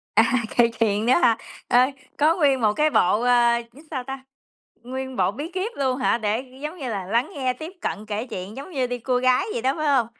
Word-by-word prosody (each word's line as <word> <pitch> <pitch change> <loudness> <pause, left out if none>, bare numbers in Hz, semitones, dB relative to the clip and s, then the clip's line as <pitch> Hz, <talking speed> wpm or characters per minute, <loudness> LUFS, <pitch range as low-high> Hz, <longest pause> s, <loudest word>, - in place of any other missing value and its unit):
À, 225 +3 +4 0.2
kể 235 -1 +6
chuyện 215 -1 +1
nữa 250 - +5
hả? 245 -8 +4 0.3
Ờ, 245 - +5 0.4
có 310 +3 +4
nguyên 280 -7 +2
một 210 -2 +3
cái 305 +4 +2
bộ, 205 -3 +3
ờ, 240 -1 +4
viết 290 - -15
sao 260 -4 -3
ta? 270 0 -7 0.6
Nguyên 260 +1 -5
bộ 185 -1 +2
bí 290 +10 -6
kiếp 380 +5 -2
luôn 265 -2 0
hả? 255 - +2
Để 215 +2 0 0.2
giống 305 +4 -5
như 265 - -4
là 195 -3 -3
lắng 235 +8 0
nghe, 260 -3 0
tiếp 315 +8 -8
cận, 215 +1 -4
kể 215 +4 -3
chuyện 205 -1 -7
giống 280 +7 -8
như 265 -6 0
đi 245 0 -4
cua 250 +1 0
gái 255 0 +3
vậy 235 - -3
đó, 265 +1 +2
phải 310 - -1
hông? 265 -5 +3
250 Hz, 235 wpm, -23 LUFS, 225-275 Hz, 0.6 s, kể